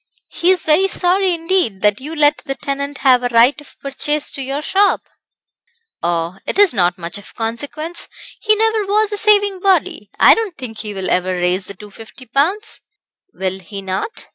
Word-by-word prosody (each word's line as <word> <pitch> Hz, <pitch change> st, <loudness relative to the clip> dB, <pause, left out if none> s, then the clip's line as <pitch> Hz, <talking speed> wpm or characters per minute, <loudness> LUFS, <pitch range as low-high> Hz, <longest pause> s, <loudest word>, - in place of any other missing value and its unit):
"He 345 Hz, -, +1 dB
is 370 Hz, -3 st, +3 dB
very 320 Hz, +5 st, +4 dB
sorry 375 Hz, 0 st, +1 dB
indeed, 330 Hz, -, -1 dB
that 210 Hz, +3 st, +2 dB
you 305 Hz, +4 st, -6 dB
let 295 Hz, -1 st, +3 dB
the 270 Hz, -, -5 dB
tenant 280 Hz, 0 st, -4 dB
have 255 Hz, -2 st, +6 dB
a 245 Hz, -, 0 dB
right 245 Hz, +5 st, +4 dB
of 295 Hz, -, -19 dB
purchase 295 Hz, +2 st, -1 dB
to 280 Hz, -, -6 dB
your 275 Hz, +3 st, -4 dB
shop." 395 Hz, +4 st, +2 dB, 1.0 s
"Oh, 170 Hz, +2 st, -2 dB
it -, -, -2 dB
is 405 Hz, -6 st, +5 dB
not 180 Hz, -4 st, +2 dB
of -, -, -36 dB
much 175 Hz, +4 st, -7 dB
consequence 290 Hz, +9 st, -4 dB, 0.3 s
he 430 Hz, -1 st, +3 dB
never 445 Hz, 0 st, +1 dB
was 425 Hz, +1 st, +2 dB
a 415 Hz, -, -1 dB
saving 410 Hz, -2 st, +3 dB
body; 380 Hz, 0 st, 0 dB
I -, -, +8 dB
don't 435 Hz, -7 st, -3 dB
think 235 Hz, -5 st, -7 dB
he 210 Hz, -2 st, -5 dB
will 190 Hz, -1 st, -3 dB
ever 185 Hz, +1 st, +1 dB
raise 180 Hz, +1 st, -1 dB
the 200 Hz, -, -8 dB
250 215 Hz, +5 st, -13 dB
pounds." 380 Hz, +11 st, 0 dB, 0.5 s
"Will 190 Hz, 0 st, -3 dB
he 195 Hz, +2 st, -9 dB
not? 190 Hz, -, -4 dB
280 Hz, 185 wpm, -18 LUFS, -, 1.0 s, I